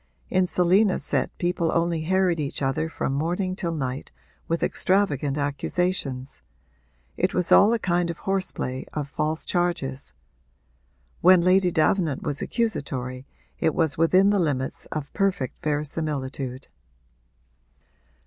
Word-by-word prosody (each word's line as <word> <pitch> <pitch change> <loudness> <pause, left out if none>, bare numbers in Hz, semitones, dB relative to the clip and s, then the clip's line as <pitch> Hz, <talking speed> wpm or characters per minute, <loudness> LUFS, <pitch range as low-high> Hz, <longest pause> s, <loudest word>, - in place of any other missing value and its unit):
In 185 0 +2
Selina's 185 +3 +3
set - - 0
people 175 -2 0
only 170 -1 0
harried 180 0 +1
each 140 -1 -3
other 135 +4 0
from 140 -3 -2
morning 175 +6 -1
till 175 -3 -2
night 135 -4 -4 0.4
with 165 0 -1
extravagant 150 -8 +1
accusations 145 -2 -2 0.8
it - - 0
was 180 - 0
all 205 +2 +7
a 235 - +2
kind 175 -4 0
of 170 - -4
horse 195 -1 -1
play 130 +1 -4
of 150 -2 -3
false 155 +2 -2
charges. 155 -7 -1 1.1
When 185 0 +6
Lady 185 +1 +4
Davenant 160 -3 +1
was 145 - -2
accusatory 135 - -2 0.3
it 160 -2 +1
was 160 -5 +1
within 185 +5 +4
the 205 - +2
limits 140 -6 -2
of 150 -2 -5
perfect 195 -10 -1
verisimilitude. 145 -3 -3
165 Hz, 130 wpm, -25 LUFS, 140-185 Hz, 1.1 s, all